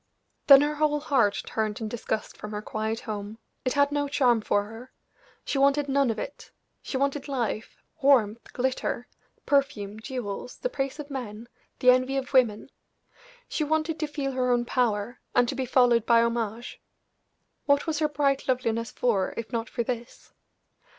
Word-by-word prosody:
Then 275 -1 +10
her 295 +1 +1
whole 300 0 +1
heart 260 -9 +1
turned 215 -1 -2
in 220 - -3
disgust 220 -1 -4
from 210 - -8
her 210 - -3
quiet 220 +1 -3
home; 210 0 -6 0.3
it 255 - 0
had 285 0 +3
no 290 0 0
charm 250 -5 +3
for 205 -1 +1
her; 225 +5 -11 0.5
she 275 - -1
wanted 280 +1 +3
none 275 -1 +2
of 225 - -1
it - - -7 0.3
she 265 - -4
wanted 280 +1 -1
life, 235 -5 -3 0.2
warmth, 235 -6 +3
glitter, 255 -1 -2 0.4
perfume, 230 -8 0
jewels, 245 -2 -5
the - - -2
praise 270 - -2
of 295 -1 -8
men, 235 -4 -6 0.3
the 250 - +6
envy 255 +2 +2
of 270 0 -4
women; 240 -2 +2 0.8
she 310 - -1
wanted 315 +1 0
to 310 - -1
feel 285 -2 -3
her 255 -1 0
own 240 0 +2
power, 235 -1 0 0.2
and 245 - +4
to - - -1
be 260 -1 -3
followed 240 -3 +4
by 230 -1 +6
homage. 235 0 -3 0.9
What 285 0 +3
was 315 -2 -1
her 305 -1 +2
bright 280 -2 0
loveliness 230 -3 0
for 210 -6 0
if 230 -1 -5
not 230 -1 -2
for 235 - -2
this? 240 0 -6
250 Hz, 170 wpm, -27 LUFS, 225-280 Hz, 0.9 s, Then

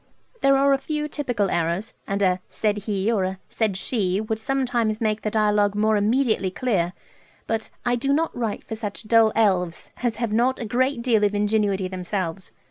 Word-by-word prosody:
There 275 0 +5
are 275 +1 +4
a 270 - +2
few 300 +1 -2
typical 245 -10 -1
errors; 170 +5 -1
and 200 0 0
a 185 -1 +2
"said 210 -1 0
he," 200 +2 +1
or 205 -5 +1
a 190 0 -3
"said 215 -4 0
she," 190 -2 0
would 220 0 -2
sometimes 240 -3 0
make 215 -1 0
the 215 - -1
dialogue 210 -1 +2
more 215 +1 +2
immediately 215 -2 +2
clear; 185 -5 0 0.5
but 225 -1 -2 0.2
"I 245 0 +2
do 275 +4 0
not 320 +3 +1
write 230 -4 -3
for - - -7
such 215 -1 -4
dull 225 -1 +5
elves" 185 -6 +1
as 240 -3 0
have 230 -2 -2
not 245 +4 +2
a 235 - -4
great 255 +2 0
deal 225 -4 +3
of 205 0 +2
ingenuity 205 -2 +1
themselves. 185 -1 -4
215 Hz, 190 wpm, -24 LUFS, 200-240 Hz, 0.5 s, There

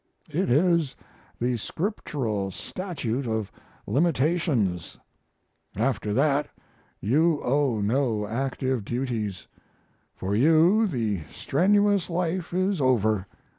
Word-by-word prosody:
It 175 +6 0
is 160 0 +3 0.4
the 120 0 0
scriptural 120 - -3
statute 135 - -4
of 110 -3 -2 0.3
limitations. 140 - +1 0.8
After 110 -1 0
that 140 +5 +2 0.5
you 150 - +2
owe 130 -4 +1
no 110 -1 +1
active 130 +1 -2
duties; 115 -5 -3 0.7
for 95 +2 -3
you 165 - +5
the 110 - -1
strenuous 200 +4 +2
life 175 0 -2
is 185 -1 0
over. 110 -6 +2
135 Hz, 95 wpm, -26 LUFS, 110-170 Hz, 0.8 s, you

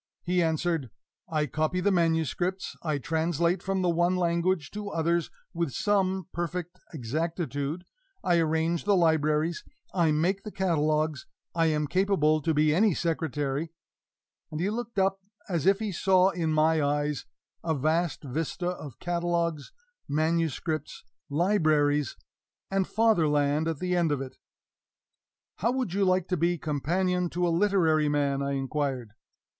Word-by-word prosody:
He 180 0 +1
answered: 160 -4 0 0.4
"I 155 -2 +1
copy 155 +6 -1
the 200 +3 +2
manuscripts, 175 +2 0
I 155 -3 -1
translate 165 +4 0
from 190 -1 -1
the 180 - +2
one 175 +2 +2
language 170 -3 0
to 210 -1 -5
others 170 -1 0 0.2
with 170 -6 -2
some 190 - +1
perfect 175 0 -4
exactitude, 155 +3 -3 0.4
I 175 -2 +3
arrange 160 +2 0
the 205 -1 +4
libraries, 160 0 +2 0.3
I 170 -4 +3
make 175 +6 +1
the 210 - -7
catalogues, 155 -6 0 0.3
I 165 -1 +2
am 150 -1 +1
capable 155 -2 +2
to 160 - 0
be 150 0 +3
any 200 +1 +3
secretary." 155 -2 -2 0.8
And 155 - -5
he 190 +5 0
looked 235 0 -5
up 195 0 +2 0.3
as 170 -3 -1
if 195 0 +5
he 215 -1 -3
saw 185 +1 +4
in 165 -4 -1
my 155 +1 +3
eyes 145 0 -1 0.4
a 160 -1 0
vast 155 +4 0
vista 160 +6 -2
of 150 -8 -7
catalogues, 170 -3 -1 0.4
manuscripts, 160 0 -1 0.3
libraries, 150 - +2 0.5
and 195 -1 +1
Fatherland 155 -8 +2
at 165 -2 -1
the 180 +3 -1
end 170 -3 +2
of 145 - 0
it. 130 -1 -7 1.2
"How 230 +5 +1
would 255 -8 -2
you 200 0 +2
like 185 -1 +2
to 180 - +1
be 170 +2 +1
companion 175 +5 0
to 175 +1 0
a 170 - +1
literary 165 -6 +3
man?" 140 -1 +1
I 140 0 -1
inquired. 135 -4 -2
165 Hz, 145 wpm, -28 LUFS, 150-180 Hz, 1.2 s, if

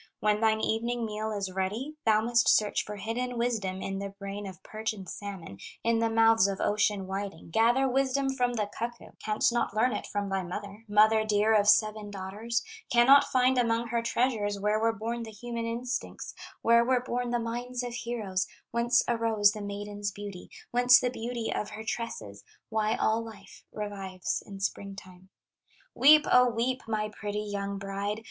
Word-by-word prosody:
When 210 0 +1
thine 220 -1 +3
evening 235 +2 -1
meal 215 0 -3
is 200 -3 -3
ready, 205 +10 -3
Thou 215 -1 +5
must 235 +1 +3
search 210 -1 +3
for 210 - -7
hidden 235 +4 -3
wisdom 210 -6 -1
In 195 0 -3
the 200 0 -4
brain 200 +1 -7
of 190 0 -11
perch 220 +1 -3
and 195 -3 -10
salmon, 185 - -7 0.2
In 230 0 +2
the 230 0 +2
mouths 225 -2 +5
of 195 -1 -3
ocean 210 -2 +1
whiting, 190 -4 -6
Gather 240 +7 +3
wisdom 270 +1 +1
from 245 -2 0
the 215 -3 0
cuckoo, 235 +1 -5
Canst 215 +2 +1
not 235 -3 -1
learn 250 +4 +2
it - - -4
from 205 -1 -2
thy 195 0 0
mother, 200 +4 -7
Mother 215 +1 +5
dear 215 0 +2
of 205 -1 +4
seven 215 0 +3
daughters; 205 +4 -3 0.3
Cannot 265 +4 +7
find 255 0 +2
among 230 -1 +1
her 235 0 0
treasures 225 -4 0
Where 210 +2 +1
were 225 +1 +2
born 230 +2 -4
the 225 - -6
human 230 +2 -5
instincts, 240 +2 -4 0.3
Where 235 0 +5
were 250 0 +2
born 245 -1 -2
the 240 - +1
minds 240 +2 -3
of 245 -1 -5
heroes, 220 -6 -2 0.2
Whence 235 +1 +3
arose 225 -3 +3
the 210 0 -7
maiden's 205 0 -4
beauty, 200 -2 -8 0.2
Whence 245 +1 +6
the 250 - -1
beauty 235 -1 -3
of 210 - -3
her 220 - -7
tresses, 110 - -5 0.3
Why 220 0 +1
all 225 -1 +1
life 225 -2 -13
revives 195 -3 -4
in 195 -1 -9
spring 200 0 -3
time. 185 -1 -13 0.6
"Weep, 300 +2 +7
O 250 0 +6
weep, 245 +3 -1
my 215 -1 -1
pretty 210 0 -4
young 200 -1 -4
bride. 200 +2 -3
220 Hz, 180 wpm, -29 LUFS, 205-235 Hz, 0.6 s, Cannot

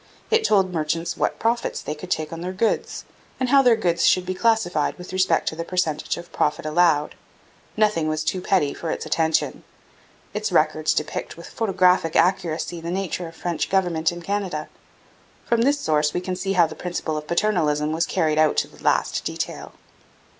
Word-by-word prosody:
It 450 0 +4
told 190 - +2
merchants 165 +1 -1
what - - -1
profits 235 +1 -1
they 150 - -4
could 155 +4 -10
take 155 -2 -2
on 165 - -6
their 180 +1 -4
goods, 220 +4 -1 0.3
and 255 -1 0
how 275 +1 +6
their 245 -3 +5
goods 170 -6 0
should 185 -1 +3
be 185 - -2
classified 200 -7 +1
with 180 0 -10
respect 185 -3 +2
to - - -8
the 165 - -4
percentage 170 -4 -1
of 170 0 -10
profit 150 0 0
allowed. 155 -1 +2 0.6
Nothing 210 -7 +2
was 155 0 -1
too 180 +4 -1
petty 180 -7 +1
for 165 - -5
its - - -3
attention. 160 -1 0 0.7
Its 215 0 -2
records 155 -2 +2
depict 150 - -3
with 170 - -10
photographic 185 -6 +2
accuracy 170 -1 +1
the 170 - -5
nature 180 -1 -3
of 165 - -12
French 170 -3 -2
government 175 -4 +1
in 175 0 -8
Canada. 190 -6 -3 0.8
From 235 -1 +2
this 285 +4 +2
source 150 - +1
we - - +1
can 185 0 -3
see 195 +2 -2
how 175 -3 +5
the 160 - -6
principle 175 -3 -4
of 150 0 -5
paternalism 155 -6 +1
was 160 +2 0
carried 155 -4 +1
out 155 -1 +3
to - - +2
the - - -18
last - - +1
detail. - - -4
175 Hz, 190 wpm, -23 LUFS, 155-190 Hz, 0.8 s, how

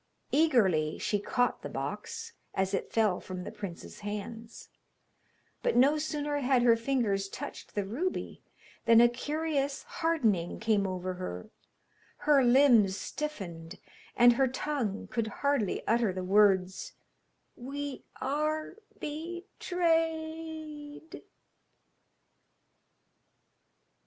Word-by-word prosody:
Eagerly 200 - +3
she 205 - 0
caught 245 +4 0
the - - -6
box 460 0 -5 0.2
as 190 +1 0
it - - -2
fell 215 -5 +2
from 185 -1 -6
the - - -6
prince's 180 -4 -8
hands, 215 +3 -7 0.9
but - - +1
no 280 +5 +5
sooner 295 -1 -2
had 255 -2 +3
her 235 -2 +6
fingers 230 -5 0
touched - - -8
the 205 -2 0
ruby, 290 - -3 0.4
than 230 0 +7
a 240 - +8
curious 285 +2 -2
hardening 320 - 0
came 215 -3 +2
over 185 0 -3
her, 90 - -6 0.7
her 290 -2 +4
limbs 240 -6 +5
stiffened, 190 - -5 0.4
and 240 0 +7
her 265 +2 +3
tongue 255 -6 -2
could 230 -2 -2
hardly 270 -2 -1
utter 230 -2 +3
the 185 0 -4
words 190 -1 +3 0.6
'We 280 +2 -6 0.2
are 305 +5 -1 0.2
betrayed.' 320 -2 -3
245 Hz, 105 wpm, -30 LUFS, 200-300 Hz, 0.9 s, a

